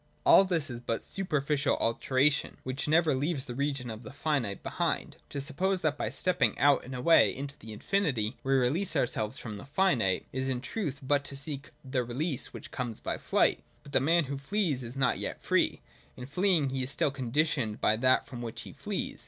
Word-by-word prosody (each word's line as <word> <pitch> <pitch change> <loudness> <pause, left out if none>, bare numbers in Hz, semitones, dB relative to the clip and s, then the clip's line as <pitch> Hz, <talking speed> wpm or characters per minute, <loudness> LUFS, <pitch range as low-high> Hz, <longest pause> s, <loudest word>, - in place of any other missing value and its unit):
All 195 - +8
this 165 -7 -1
is 120 0 -6
but 115 -2 -2
super 180 -6 -1
i - - -6
ficial 145 -1 +1
alternation, 130 +5 +1
which 130 +3 -3
never 160 0 +4
leaves 140 +1 -1
the 120 - -6
region 135 -2 -2
of 110 0 -8
the 110 - -9
finite 140 -8 -1
behind. - - -2
To 140 - -4
suppose 180 +7 -1
that 155 -3 +1
by - - -2
stepping 145 - +1
out 145 -1 +4
and 130 +1 -7
away 130 +7 +5
into 140 +1 -4
that 110 - -12
infinity 130 - 0
we 135 - +1
release 155 +9 +1
ourselves 125 -3 0
from 105 -3 -6
the 100 - -10
finite, 135 - +1
is 130 +1 -1
in 130 -2 0
truth 140 - -4
but 140 +1 +2
to 140 - -5
seek 145 0 -4 0.2
the 130 -1 0
release 130 +4 -2
which - - -10
comes 120 -4 -4
by - - -3
flight. - - +2 0.2
But 140 - -12
the 135 - +3
man 165 +4 +4
who 140 0 -5
flees 155 -3 0
is 120 +2 -7
not 130 -2 +2
yet - - -4
free: - - +1 0.4
in 125 - -7
fleeing 165 -1 +2
he 135 0 -2
is 130 - -2
still 140 - +1
conditioned 135 -3 0
by 110 - +3
that 130 +2 +3
from 120 -3 -8
which 115 -2 -5
he - - -10
flees. - - -4
135 Hz, 210 wpm, -30 LUFS, 125-150 Hz, 0.4 s, All